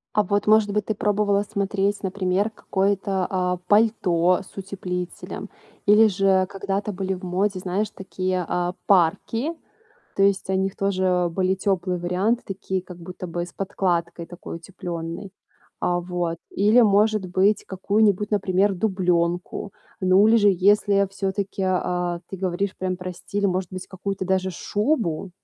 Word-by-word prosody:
А 210 Hz, -, +5 dB
вот, 205 Hz, +1 st, 0 dB
может 215 Hz, -1 st, +4 dB
быть, 210 Hz, 0 st, 0 dB
ты 220 Hz, -, -1 dB
пробовала 205 Hz, 0 st, +1 dB
смотреть, 200 Hz, 0 st, -1 dB
например, 190 Hz, +2 st, 0 dB
какое-то, 195 Hz, -2 st, 0 dB
а, 180 Hz, -1 st, 0 dB
пальто 190 Hz, -5 st, +3 dB
с -, -, -18 dB
утеплителем? 185 Hz, -2 st, -5 dB, 0.4 s
Или 210 Hz, +2 st, +7 dB
же 190 Hz, -1 st, +3 dB
когда-то 200 Hz, +1 st, -3 dB
были 190 Hz, 0 st, -2 dB
в 185 Hz, -, -12 dB
моде, 190 Hz, +2 st, 0 dB
знаешь, 190 Hz, +4 st, -1 dB
такие, 185 Hz, -2 st, -3 dB
а, 180 Hz, 0 st, -1 dB
парки? 205 Hz, -, +2 dB, 0.6 s
То 195 Hz, -, +2 dB
есть, 195 Hz, -1 st, +2 dB
о 190 Hz, -, +2 dB
них 190 Hz, 0 st, -1 dB
тоже 185 Hz, -2 st, +1 dB
были 185 Hz, +2 st, +1 dB
тёплые 185 Hz, -2 st, -1 dB
варианты, 190 Hz, +7 st, 0 dB
такие 190 Hz, -1 st, -3 dB
как 180 Hz, -1 st, -11 dB
будто 180 Hz, +1 st, -8 dB
бы 175 Hz, +1 st, -3 dB
с -, -, -15 dB
подкладкой 175 Hz, -3 st, -2 dB
такой 175 Hz, -1 st, -8 dB
утеплённой, 170 Hz, +1 st, -6 dB, 0.5 s
а, 175 Hz, 0 st, +1 dB
вот. 175 Hz, -1 st, -2 dB
Или 215 Hz, +5 st, +4 dB
может 210 Hz, -1 st, +3 dB
быть, 190 Hz, +4 st, +2 dB
какую-нибудь, 205 Hz, +1 st, +1 dB
например, 195 Hz, -1 st, +2 dB
дублёнку. 180 Hz, -1 st, 0 dB, 0.3 s
Ну 185 Hz, +3 st, +5 dB
или 230 Hz, -, +6 dB
же, 205 Hz, -2 st, +5 dB
если 200 Hz, +1 st, +3 dB
всё-таки, 195 Hz, 0 st, -3 dB
а, 180 Hz, -2 st, -1 dB
ты 190 Hz, -, -6 dB
говоришь 185 Hz, +1 st, -2 dB
прям 185 Hz, -1 st, -2 dB
про 180 Hz, 0 st, -5 dB
стиль, 200 Hz, +3 st, -2 dB
может 185 Hz, -1 st, -1 dB
быть, 185 Hz, 0 st, -6 dB
какую-то 190 Hz, 0 st, -4 dB
даже 190 Hz, 0 st, +1 dB
шубу? 205 Hz, -, -1 dB
190 Hz, 150 wpm, -23 LUFS, 180-200 Hz, 0.6 s, Или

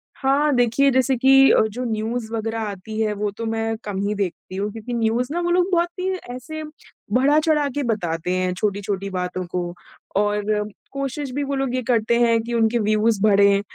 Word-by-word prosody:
हाँ, 285 Hz, +2 st, +2 dB
देखिए 245 Hz, +3 st, +3 dB
जैसे 260 Hz, +1 st, +2 dB
कि 270 Hz, +2 st, +6 dB
अ, -, -, +5 dB
जो 245 Hz, +4 st, -4 dB
न्यूज़ 225 Hz, +1 st, -3 dB
वग़ैरह 225 Hz, 0 st, -2 dB
आती 215 Hz, +1 st, -5 dB
है, 215 Hz, -1 st, +1 dB
वो 210 Hz, 0 st, -2 dB
तो 230 Hz, +3 st, -6 dB
मैं 225 Hz, 0 st, -1 dB
कम 200 Hz, -2 st, -4 dB
ही 210 Hz, -, -1 dB
देखती 190 Hz, -1 st, -4 dB
हूँ 205 Hz, +2 st, -2 dB
क्योंकि 225 Hz, +3 st, -7 dB
न्यूज़ 235 Hz, +2 st, +1 dB
ना 345 Hz, -, -1 dB
वो 345 Hz, -, -1 dB
लोग 360 Hz, +1 st, +2 dB
बहुत 345 Hz, -1 st, +2 dB
ही 370 Hz, -, -1 dB, 0.3 s
ऐसे 310 Hz, +5 st, -7 dB, 0.5 s
बढ़ा-चढ़ा 295 Hz, +3 st, +3 dB
के 290 Hz, -, 0 dB
बताते 180 Hz, -7 st, -2 dB
हैं 185 Hz, 0 st, 0 dB
छोटी-छोटी 200 Hz, 0 st, -2 dB
बातों 180 Hz, -1 st, -3 dB
को 175 Hz, -1 st, -2 dB, 0.4 s
और 210 Hz, +1 st, +1 dB, 0.3 s
कोशिश 275 Hz, 0 st, -4 dB
भी 285 Hz, +2 st, -2 dB
वो 280 Hz, 0 st, -2 dB
लोग 270 Hz, -2 st, -1 dB
ये 255 Hz, -, 0 dB
करते 235 Hz, -1 st, +2 dB
हैं 230 Hz, -1 st, +4 dB
कि 235 Hz, +1 st, -5 dB
उनके 230 Hz, 0 st, +2 dB
व्यूज़ 215 Hz, 0 st, +2 dB
बढ़े। 200 Hz, -1 st, +5 dB
225 Hz, 190 wpm, -22 LUFS, 205-265 Hz, 0.5 s, कि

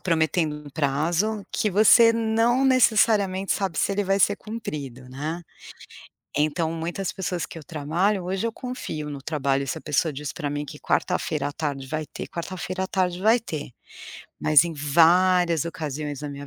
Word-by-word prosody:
prometendo 160 Hz, -2 st, +1 dB
um 150 Hz, -1 st, -11 dB
prazo 165 Hz, +9 st, 0 dB
que 210 Hz, -, 0 dB
você 220 Hz, +4 st, +7 dB
não 230 Hz, +3 st, +2 dB
necessariamente 215 Hz, -6 st, +3 dB
sabe 185 Hz, -6 st, -2 dB
se 200 Hz, -, +1 dB
ele 205 Hz, +1 st, 0 dB
vai 195 Hz, +1 st, +1 dB
ser -, -, +3 dB
cumprido, 140 Hz, -, -7 dB
né. 155 Hz, +6 st, -4 dB, 1.0 s
Então 155 Hz, +2 st, +1 dB
muitas 170 Hz, +3 st, -3 dB
pessoas 180 Hz, -2 st, -3 dB
que 165 Hz, -, -9 dB
eu 150 Hz, -, -12 dB
trabalho, 175 Hz, +5 st, -1 dB
hoje 190 Hz, +5 st, -2 dB
eu 230 Hz, -, -2 dB
confio 220 Hz, -, -5 dB
no 140 Hz, -2 st, -7 dB
trabalho, 140 Hz, -3 st, -1 dB
se -, -, -3 dB
a -, -, -13 dB
pessoa 150 Hz, +1 st, 0 dB
diz 145 Hz, +1 st, -5 dB
para 150 Hz, -4 st, -3 dB
mim 145 Hz, +1 st, -3 dB
que -, -, -9 dB
quarta-feira 145 Hz, -2 st, -1 dB
à -, -, -7 dB
tarde 140 Hz, -3 st, -4 dB
vai 155 Hz, +1 st, -3 dB
ter, -, -, -8 dB
quarta-feira 185 Hz, +1 st, -4 dB
à -, -, -3 dB
tarde 180 Hz, -2 st, -1 dB
vai 225 Hz, +4 st, +4 dB
ter. 155 Hz, -, -6 dB, 0.7 s
Mas 155 Hz, +1 st, +6 dB
em 170 Hz, -, -4 dB
várias 170 Hz, +3 st, +4 dB
ocasiões 150 Hz, -3 st, -5 dB
na 145 Hz, -, -4 dB
minha 140 Hz, 0 st, -8 dB
165 Hz, 175 wpm, -24 LUFS, 150-195 Hz, 1.0 s, você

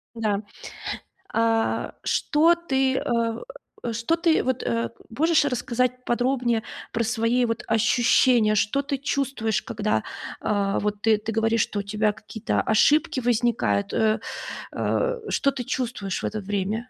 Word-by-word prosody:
Да, 210 Hz, -3 st, 0 dB, 0.9 s
а-а, 225 Hz, 0 st, +1 dB
что 330 Hz, +3 st, +3 dB
ты, 270 Hz, -6 st, 0 dB
э-э, 235 Hz, -, -3 dB
что 230 Hz, +9 st, +1 dB
ты, 335 Hz, -1 st, +2 dB
вот, 260 Hz, -1 st, -1 dB
э, 115 Hz, -1 st, -1 dB, 0.2 s
можешь 315 Hz, +6 st, +3 dB
рассказать 250 Hz, -1 st, -1 dB
подробнее 240 Hz, -2 st, +1 dB, 0.3 s
про 230 Hz, -, 0 dB
свои 235 Hz, +2 st, +1 dB
вот 230 Hz, -1 st, -2 dB
ощущения, 225 Hz, 0 st, +4 dB
что 210 Hz, +7 st, +1 dB
ты 280 Hz, 0 st, -2 dB
чувствуешь, 270 Hz, -5 st, -1 dB
когда, 215 Hz, -2 st, -1 dB, 0.4 s
а-а, 200 Hz, -1 st, 0 dB
вот 205 Hz, 0 st, -2 dB
ты 220 Hz, -1 st, +4 dB
ты 215 Hz, +2 st, -4 dB
говоришь, 225 Hz, 0 st, +2 dB
что 205 Hz, -, -1 dB
у -, -, 0 dB
тебя 210 Hz, +1 st, +1 dB
какие-то 220 Hz, +1 st, -2 dB
ошибки 275 Hz, +6 st, +3 dB
возникают, 230 Hz, -, +1 dB
э-э, 220 Hz, 0 st, +2 dB, 0.6 s
э-э, -, -, -1 dB
что 280 Hz, -, +2 dB
ты 265 Hz, -2 st, -5 dB
чувствуешь 230 Hz, -6 st, -3 dB
в -, -, -1 dB
это 215 Hz, -, -2 dB
время? 205 Hz, +4 st, -2 dB
230 Hz, 140 wpm, -24 LUFS, 215-260 Hz, 0.9 s, ощущения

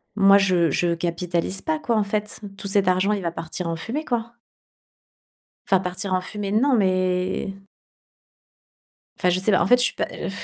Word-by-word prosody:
moi 195 Hz, -1 st, +6 dB
je 180 Hz, -5 st, +2 dB
je 170 Hz, +4 st, +1 dB
capitalise 175 Hz, +2 st, -2 dB
pas 315 Hz, -1 st, -1 dB
quoi 235 Hz, -6 st, -1 dB
en 210 Hz, -, +2 dB
fait. 210 Hz, +1 st, -3 dB, 0.2 s
Tout 200 Hz, -, -5 dB
cet 195 Hz, -1 st, +1 dB
argent 185 Hz, +3 st, +2 dB
il 205 Hz, -, -2 dB
va 170 Hz, -, -1 dB
partir 165 Hz, +1 st, -5 dB
en 165 Hz, -, -2 dB
fumée, 240 Hz, -, -4 dB
quoi». 235 Hz, -1 st, -3 dB, 1.3 s
Enfin 190 Hz, -1 st, +4 dB
partir 185 Hz, +1 st, -3 dB
en 185 Hz, -, +2 dB
fumée 205 Hz, +1 st, -4 dB
non, 255 Hz, +6 st, +3 dB
mais 185 Hz, -1 st, 0 dB, 1.6 s
enfin 180 Hz, -, +1 dB
je 180 Hz, -, +1 dB
sais 195 Hz, +3 st, +1 dB
pas. -, -, +3 dB
En -, -, +2 dB
fait 245 Hz, -, +6 dB
je 245 Hz, -, +3 dB
suis -, -, +1 dB
pas, -, -, -2 dB
heu, -, -, -5 dB
195 Hz, 190 wpm, -23 LUFS, 180-210 Hz, 1.6 s, moi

